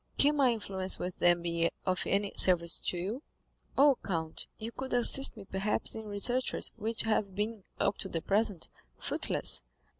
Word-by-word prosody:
"Can 290 +1 +4
my 265 -3 +3
influence 190 -4 0
with 180 0 -6
them 175 -1 +3
be 170 -1 0 0.2
of 185 -1 -1
any 200 0 0
service 170 -2 +6
to 180 - -3
you?" 210 - -5 0.5
"Oh, 280 -1 +4
count, 160 -4 -3
you 225 +1 -6
could 260 +1 -7
assist 245 +1 +3
me 205 - -10
perhaps 195 +2 -1
in 220 -1 -5
researches 240 +5 0
which 225 0 -2
have 215 -3 -1
been, 210 0 -4
up 195 - 0
to 190 - -3
the 165 -2 -4
present, 205 -3 0 0.3
fruitless. - - +1
205 Hz, 170 wpm, -30 LUFS, 185-230 Hz, 0.5 s, service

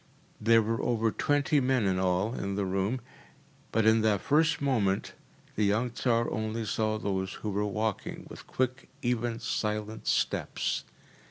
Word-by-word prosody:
There 115 +1 +5
were 115 +1 -1
over 115 -2 +1
twenty 145 +3 +2
men 130 -4 +2
in 95 -1 +1
all 95 +4 +1
in 100 -5 -3
the 100 -1 0
room, 95 +7 -1 0.7
but 110 0 +2
in 110 0 +5
that 105 -2 +3
first 150 +1 +3
moment 110 -9 +1 0.4
the 105 - +1
young 110 +4 +2
Tsar 115 -1 +1
only 110 +1 -2
saw 110 0 0
those 95 -2 -2
who 105 - 0
were 105 +1 0
walking 110 0 -3
with - - -11
quick, 130 +1 -2
even, 120 -1 0
silent 110 -2 -3
steps. - - 0
110 Hz, 155 wpm, -29 LUFS, 105-120 Hz, 0.7 s, There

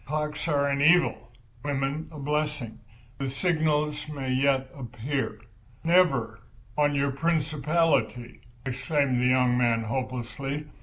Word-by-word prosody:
Clocks 150 +2 -3
are 140 -3 +2
an 140 0 0
evil, 175 +4 +4 0.3
women 140 +2 -2
a 155 - -10
blessing. 150 -5 -2 0.4
The 135 -1 -2
signal 155 0 +1 0.2
may 135 -3 -3
yet 130 0 +2
appear." 125 -2 -3 0.4
"Never, 135 -10 +3 0.4
on 145 0 +2
your 140 0 +1
principality!" 155 -4 0 0.2
exclaimed 130 0 0
the 125 - +3
young 125 -1 +3
man, 115 -2 +2
hopelessly. 130 +4 -4
140 Hz, 115 wpm, -27 LUFS, 130-150 Hz, 0.4 s, evil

